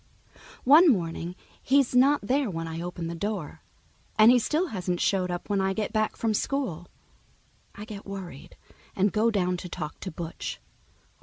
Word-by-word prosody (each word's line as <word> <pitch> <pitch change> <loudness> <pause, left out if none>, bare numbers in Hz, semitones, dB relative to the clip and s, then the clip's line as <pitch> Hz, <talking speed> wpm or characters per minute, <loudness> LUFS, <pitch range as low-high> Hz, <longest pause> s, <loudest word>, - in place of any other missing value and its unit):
One 310 +6 +7
morning 170 -3 -2 0.3
he's 270 -1 +2
not 275 +4 +5
there 260 +3 +1
when 165 -2 -4
I 165 +1 -5
open 175 -1 -5
the 165 - -4
door, 170 -3 -4 0.6
and 215 +2 +8
he 250 - +5
still 315 +9 0
hasn't 180 -3 -2
showed 185 -2 +1
up 175 0 -4
when 200 -2 +1
I 190 0 +1
get 215 +1 -3
back 215 -1 0
from 225 -1 0
school. 200 - -2 0.9
I 205 - -8
get 210 -2 -9
worried 190 -8 -8 0.4
and 200 +1 +2
go 225 +1 +3
down 180 -4 0
to 180 - -7
talk 155 -3 -6
to 190 - -5
Butch. 165 -1 -6
195 Hz, 170 wpm, -27 LUFS, 175-230 Hz, 0.9 s, and